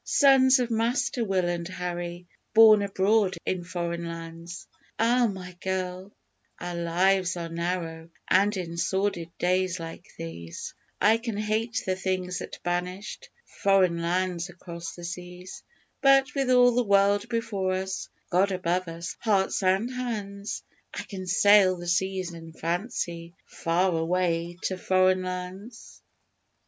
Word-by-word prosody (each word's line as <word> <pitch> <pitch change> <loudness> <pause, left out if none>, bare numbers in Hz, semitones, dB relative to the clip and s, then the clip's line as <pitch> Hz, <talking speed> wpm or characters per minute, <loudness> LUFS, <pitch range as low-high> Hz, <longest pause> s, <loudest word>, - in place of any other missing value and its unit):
Sons 270 -2 +5
of 245 -2 -1
Master 230 +2 0
Will 190 -4 +1
and 170 -1 -2
Harry 175 -1 -5 0.3
born 220 -2 +8
abroad 200 0 +2
in 185 -2 -1
Foreign 170 -1 -3
Lands! 165 +1 -8 0.3
_Ah, 235 0 +3
my 185 -2 -8
girl, 185 0 -3 0.5
our 175 - -5
lives 175 +2 +1
are 170 -1 -4
narrow, 165 -1 -3 0.2
and 200 +2 +3
in 170 -2 -5
sordid 185 -1 -1
days 185 0 +1
like 165 +1 -8
these, 85 0 -7 0.3
I 220 +3 +4
can 230 -3 -4
hate 215 +2 -1
the 185 - 0
things 185 -1 -2
that - - -7
banished 180 +3 -3 0.3
'Foreign 185 -4 +3
Lands 175 +1 -1
across 170 -1 -8
the 175 - -10
seas,' 180 +1 -8 0.4
But 275 +1 +5
with 275 -2 0
all 250 -1 +6
the 245 +1 +2
world 200 +1 +3
before 210 -5 -1
us, 190 0 -3 0.2
God 190 +3 +3
above 180 0 -1
us 165 +1 -6
hearts 200 -4 +1
and 195 +6 +1
hands, 210 -5 -4 0.3
I - - -4
can 185 -2 -7
sail 190 0 +5
the 175 - -8
seas 185 0 0
in 165 -1 -10
fancy 170 -1 -3
far 180 +2 0
away 170 0 0
to 185 -1 -2
Foreign 185 0 +3
Lands. 185 +6 -7
185 Hz, 135 wpm, -27 LUFS, 175-205 Hz, 0.5 s, born